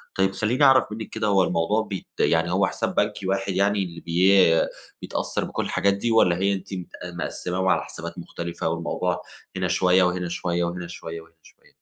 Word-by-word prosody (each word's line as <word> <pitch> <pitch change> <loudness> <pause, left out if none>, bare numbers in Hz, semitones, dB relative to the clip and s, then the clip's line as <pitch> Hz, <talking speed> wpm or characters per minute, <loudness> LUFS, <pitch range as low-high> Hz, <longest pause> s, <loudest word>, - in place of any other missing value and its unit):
طيب 95 0 +2
خلّيني 115 +8 0
أعرف 135 -1 +6
منِّك 110 0 -6
كده 105 - -2
هو 95 -2 +4
الموضوع 90 +6 +1
بيت 100 -4 -6
يعني - - +2
هو - - +3
حساب - - -3
بنكي 95 - 0
واحد 95 0 -1
يعني 100 +1 +2
اللي 85 -2 -8
بي 95 +3 +4 0.6
بيتأثّر - - -2
بكل - - -3
الحاجات 100 0 +2
دي 115 +4 -1
والّا 90 -6 +4
هي 100 +1 +2
أنتِ 95 0 -6
مت 90 -2 -5 0.2
مقسّماهم 90 +1 -3
على - - +3
حسابات - - -8
مختلفة 85 -1 -4
والموضوع 85 0 -2 0.4
هنا - - 0
شوية 90 0 +3
وهنا 90 -1 0
شوية 85 0 -1
وهنا 85 0 -3
شوية 85 -1 -7
وهنا 80 0 -20
شوية؟ - - -21
95 Hz, 190 wpm, -24 LUFS, 85-100 Hz, 0.6 s, أعرف